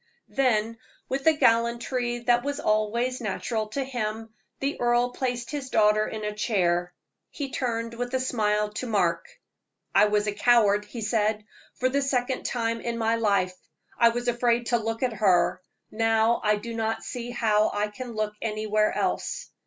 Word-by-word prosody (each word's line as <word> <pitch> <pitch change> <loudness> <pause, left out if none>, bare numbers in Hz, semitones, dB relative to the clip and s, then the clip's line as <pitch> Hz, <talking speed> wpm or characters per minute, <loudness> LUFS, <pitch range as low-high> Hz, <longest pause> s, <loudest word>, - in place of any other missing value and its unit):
Then, 230 -4 +1 0.3
with 270 +1 -2
the 320 - +6
gallantry 240 -1 +1
that 240 0 +2
was 285 0 -3
always 235 +4 0
natural 215 +1 -2
to 270 +6 -3
him, 225 -3 -4 0.3
the 275 -1 -2
earl 240 +1 +2
placed 245 -2 -3
his 285 -3 -4
daughter 215 -1 +3
in 215 -1 -6
a 210 0 -2
chair. 175 -5 0 0.4
He 275 -3 -5
turned 230 -3 -2
with 245 +1 -4
a - - +2
smile 210 -4 0
to 255 - -4
Mark. 205 - +1 0.7
"I - - +6
was 210 0 +1
a 210 - 0
coward," 210 -1 +3
he 225 +3 -8
said, 215 0 0 0.3
"for 255 - +1
the 280 +2 +1
second 260 -1 -1
time 230 -1 -1
in 235 -1 -3
my 225 0 +1
life. 200 -5 +1 0.4
I 235 - +5
was 240 +1 -3
afraid 240 0 +1
to 240 - +2
look 225 +2 -3
at 250 -2 +1
her; 180 -4 +2 0.3
now 225 +1 +2
I 210 0 +3
do 230 +3 -6
not 225 0 -2
see 245 -1 -5
how 215 -3 +2
I 205 +1 -1
can 240 +3 -7
look 215 -1 -2
anywhere 215 -1 0
else. - - -2
230 Hz, 170 wpm, -26 LUFS, 210-245 Hz, 0.7 s, the